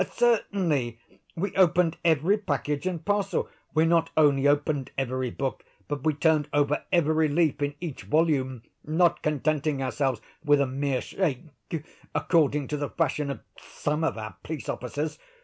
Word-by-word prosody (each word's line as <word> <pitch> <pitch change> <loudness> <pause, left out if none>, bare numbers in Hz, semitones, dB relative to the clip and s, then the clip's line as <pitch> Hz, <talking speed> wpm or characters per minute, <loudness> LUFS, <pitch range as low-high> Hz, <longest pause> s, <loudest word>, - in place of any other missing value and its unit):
"Certainly; 180 - +1 0.4
we 185 +3 -3
opened 180 -2 +4
every 165 +4 +3
package 150 -5 -2
and 170 -3 -3
parcel; 205 -1 0 0.3
we 160 +1 +5
not 165 0 +3
only 145 -3 +5
opened 145 -1 +1
every 130 -1 -1
book, 135 +2 -3 0.2
but 145 -2 -4
we 155 -2 +2
turned 155 -1 +2
over 145 0 +1
every 160 -2 +3
leaf 155 0 +1
in 145 0 -1
each 165 -6 -5
volume, 135 -6 +1 0.2
not 165 +3 +2
contenting 150 -1 0
ourselves 130 -2 0 0.2
with 145 -2 +4
a 140 - +3
mere 135 0 -1
shake, 165 -6 -2 0.7
according 150 -4 +2
to 150 - -1
the 145 -1 -3
fashion 150 -3 -1
of 135 -5 -5 0.2
some 150 +2 -3
of 160 - 0
our 110 -1 -6
police 155 -3 -6
officers. 145 +5 -3
150 Hz, 150 wpm, -27 LUFS, 140-165 Hz, 0.7 s, we